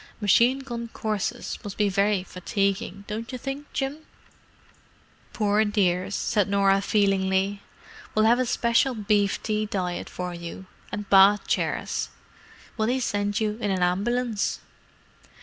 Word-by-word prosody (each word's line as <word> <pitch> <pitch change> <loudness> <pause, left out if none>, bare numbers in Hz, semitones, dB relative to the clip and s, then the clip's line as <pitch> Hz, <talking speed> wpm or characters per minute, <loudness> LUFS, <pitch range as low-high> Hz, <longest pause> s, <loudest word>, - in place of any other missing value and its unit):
"Machine 235 +5 +4
gun 235 -3 -5
courses 215 -3 -3
must 200 -1 -7
be 210 - +3
very 200 0 +1
fatiguing, 195 +1 -2
don't 225 +3 -5
you 255 - -4
think, 275 +3 -6
Jim?" 275 +2 -2 1.3
"Poor 210 0 +2
dears!" 195 -2 +1
said 205 -4 +1
Norah 195 -1 +3
feelingly. 195 -1 +1 0.5
"We'll 215 0 +4
have 235 +2 +4
a 255 - +1
special 235 +2 +2
beef 205 -2 +1
tea 215 -1 -1
diet 180 -3 -3
for 180 -1 -5
you, 170 +2 -8 0.3
and 205 0 -5
bath 195 +1 +6
chairs. - - -1 0.7
Will 220 -1 +1
they 255 +2 +1
send 205 -3 -1
you 215 0 -1
in 205 - 0
an 185 -2 +1
ambulance?" 215 +5 0
205 Hz, 135 wpm, -25 LUFS, 195-230 Hz, 1.3 s, bath